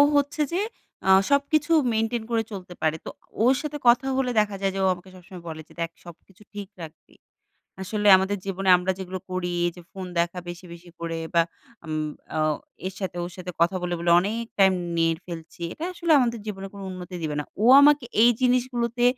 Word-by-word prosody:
হচ্ছে 285 Hz, +2 st, +1 dB
যে 355 Hz, -, +1 dB, 0.5 s
আ -, -, +3 dB, 0.2 s
সবকিছু 290 Hz, +2 st, +2 dB, 0.2 s
মেইনটেইন 225 Hz, +1 st, 0 dB
করে 225 Hz, -1 st, +2 dB
চলতে 185 Hz, -3 st, -8 dB
পারে। 155 Hz, 0 st, +1 dB
তো -, -, -4 dB, 0.3 s
ওর 250 Hz, +3 st, +6 dB
সাথে 300 Hz, -1 st, -4 dB
কথা 240 Hz, +3 st, +5 dB
হলে 260 Hz, -2 st, +1 dB
দেখা 210 Hz, -1 st, +1 dB
যায় 195 Hz, 0 st, +1 dB
যে -, -, -2 dB
ও -, -, +4 dB
আমাকে 180 Hz, +1 st, -13 dB
সবসময় 180 Hz, 0 st, -12 dB
বলে 160 Hz, -1 st, -6 dB
যে, -, -, -18 dB
"দেখ 165 Hz, 0 st, -2 dB
সবকিছু 175 Hz, +3 st, -15 dB
ঠিক 205 Hz, -1 st, -6 dB
রাখবি। 160 Hz, 0 st, -12 dB, 0.7 s
আসলে 210 Hz, +2 st, -2 dB
আমাদের 190 Hz, +2 st, 0 dB
জীবনে 195 Hz, 0 st, -2 dB
আমরা 180 Hz, +1 st, -1 dB
যেগুলো 185 Hz, 0 st, -5 dB
করি 185 Hz, -1 st, -2 dB, 0.2 s
এইযে 175 Hz, +1 st, -5 dB
ফোন 190 Hz, -1 st, -6 dB
দেখা 170 Hz, +1 st, 0 dB
বেশি, 175 Hz, +1 st, -8 dB
বেশি 170 Hz, +1 st, -12 dB
করে 165 Hz, -1 st, -3 dB, 0.2 s
বা 170 Hz, -, +6 dB, 0.4 s
উম 155 Hz, -1 st, -2 dB, 0.3 s
অ -, -, 0 dB, 0.5 s
এর 190 Hz, -, -4 dB
সাথে 185 Hz, -3 st, -4 dB
ওর 175 Hz, -, -6 dB
সাথে 180 Hz, -1 st, -6 dB
কথা 175 Hz, +3 st, +3 dB
বলে, 175 Hz, 0 st, -1 dB
বলে 170 Hz, +1 st, 0 dB
অনেক 220 Hz, +5 st, -2 dB
টাইম 190 Hz, -1 st, +6 dB, 0.2 s
নিয়ে 165 Hz, 0 st, +3 dB
ফেলছি। 170 Hz, -1 st, -9 dB
এটা 320 Hz, -, -6 dB
আসলে 340 Hz, -2 st, +1 dB
আমাদের 235 Hz, -3 st, +1 dB
জীবনে 195 Hz, -2 st, -5 dB
কোনো 200 Hz, -1 st, -8 dB
উন্নতি 185 Hz, 0 st, -8 dB
দিবে 155 Hz, -2 st, -2 dB
না।" -, -, -4 dB, 0.2 s
ও -, -, +3 dB, 0.2 s
আমাকে 290 Hz, -1 st, +5 dB, 0.2 s
এই 240 Hz, -, +7 dB
জিনিসগুলোতে 245 Hz, -1 st, +1 dB
190 Hz, 195 wpm, -25 LUFS, 175-235 Hz, 0.7 s, এই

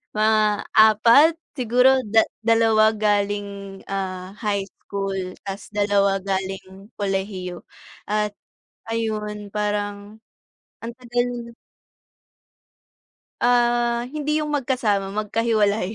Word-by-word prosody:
mga 215 Hz, -1 st, +2 dB
4 230 Hz, +8 st, +6 dB, 0.2 s
siguro 250 Hz, +1 st, +4 dB
da 220 Hz, 0 st, +6 dB, 0.2 s
dalawa 225 Hz, -1 st, +4 dB
galing, 205 Hz, -2 st, -2 dB
ah, 190 Hz, -1 st, -4 dB
high 205 Hz, -3 st, -1 dB
school 195 Hz, -2 st, -5 dB
tapos 195 Hz, +1 st, -6 dB
2 200 Hz, -1 st, +2 dB
galing 195 Hz, +1 st, -5 dB
kolehiyo 190 Hz, -3 st, -3 dB, 0.4 s
at 210 Hz, 0 st, 0 dB, 0.6 s
ayun 210 Hz, -2 st, -3 dB
parang 205 Hz, 0 st, -3 dB, 0.6 s
ang 235 Hz, +1 st, -5 dB
tagal 245 Hz, -1 st, -3 dB, 1.9 s
Ah, 240 Hz, 0 st, +2 dB
hindi 300 Hz, 0 st, 0 dB
yung 300 Hz, -1 st, -2 dB
magkasama, 230 Hz, -8 st, 0 dB
magkahiwalay, 215 Hz, -1 st, 0 dB
210 Hz, 85 wpm, -22 LUFS, 200-230 Hz, 1.9 s, 4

